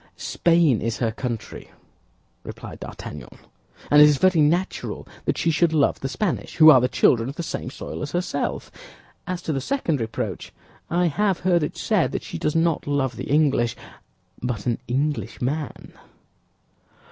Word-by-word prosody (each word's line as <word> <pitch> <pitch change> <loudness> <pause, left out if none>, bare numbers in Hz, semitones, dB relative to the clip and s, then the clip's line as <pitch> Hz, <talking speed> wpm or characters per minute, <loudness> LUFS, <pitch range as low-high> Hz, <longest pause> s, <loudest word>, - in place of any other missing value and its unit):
"Spain 165 -9 +2
is 115 -1 -2
her 115 -2 0
country," 120 -1 -6 0.7
replied - - -9
D'Artagnan; 75 -4 -9 0.5
"and 145 0 +8
it 150 - +10
is 145 - +2
very 185 0 +4
natural 170 +5 -1 0.2
that - - 0
she 165 - +1
should 160 +1 +2
love 145 -3 +2
the 135 - -3
Spanish, 170 +8 -2
who 155 -1 +9
are 130 -4 +6
the 125 - +2
children 120 -1 +2
of 140 - -7
the 170 - -4
same 145 - -4
soil - - -7
as 150 -1 -4
herself. 175 +1 -2 0.6
As 185 -2 -4
to 160 - -2
the 135 - -2
second 165 - -1
reproach, 115 0 -4 0.4
I 175 +1 +2
have 195 +3 0
heard 175 -2 +3
it 150 - -3
said - - +1
that - - -3
she 85 - -6
does 150 - -1
not 165 -2 +1
love 135 -4 0
the - - -6
English, 140 -5 +2 0.7
but 120 -5 -3
an 120 -2 0
Englishman." 135 +1 -3
150 Hz, 165 wpm, -23 LUFS, 125-170 Hz, 0.7 s, it